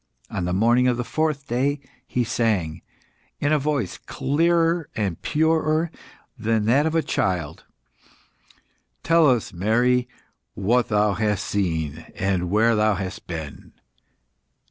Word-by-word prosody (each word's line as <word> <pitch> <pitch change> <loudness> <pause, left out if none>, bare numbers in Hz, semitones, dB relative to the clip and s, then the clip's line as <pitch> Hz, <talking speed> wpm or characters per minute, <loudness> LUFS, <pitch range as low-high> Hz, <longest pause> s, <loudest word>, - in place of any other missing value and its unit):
On 90 - -2
the 90 - -1
morning 120 +6 +3
of 125 -1 +1
the 120 - -1
fourth 155 +1 -1
day, 135 +5 0 0.3
he 125 - 0
sang, 105 -10 -1 0.6
in 145 +1 +1
a 150 - +3
voice 140 - -2
clearer 165 +2 +1
and 100 -6 -2
purer 160 +1 +1 0.4
than 110 -3 0
that 135 +7 +3
of 160 - -2
a 165 - +2
child 90 -5 -2 1.4
"Tell 165 -1 +4
us, 120 -7 0
Mary, 120 +7 +1 0.5
what 115 +5 +1
thou 105 -1 +2
hast 105 0 -1
seen 80 -7 -1 0.5
where 110 +4 +3
thou 105 -1 +2
hast 95 -1 -6
been?" 80 -4 -7
120 Hz, 125 wpm, -23 LUFS, 100-145 Hz, 1.4 s, Tell